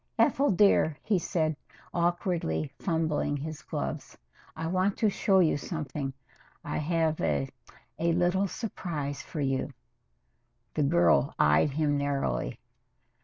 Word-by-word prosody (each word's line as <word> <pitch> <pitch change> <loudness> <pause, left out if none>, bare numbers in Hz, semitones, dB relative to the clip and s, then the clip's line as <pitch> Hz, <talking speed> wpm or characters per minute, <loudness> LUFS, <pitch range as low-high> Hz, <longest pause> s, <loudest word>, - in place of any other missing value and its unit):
"Ethel 285 +1 +3
dear," 180 -6 +4
he 205 -4 +2
said, 160 -2 0 0.4
awkwardly 170 - 0
fumbling 160 -4 0
his 150 +1 -6
gloves, - - -5 0.4
"I 160 - -4
want 185 +4 +1
to 215 -2 +2
show 195 0 +2
you 160 -4 +3
something. 145 -3 -4 0.5
I - - -3
have 160 0 0
a 70 -2 +1 0.5
a 170 +1 +2
little 180 +3 +2
surprise 155 - -4
for 155 - -5
you." 135 -1 0 1.0
The 155 - 0
girl 150 -1 +3
eyed 75 - +4
him 145 0 +1
narrowly. 135 - -1
160 Hz, 120 wpm, -29 LUFS, 140-175 Hz, 1.0 s, dear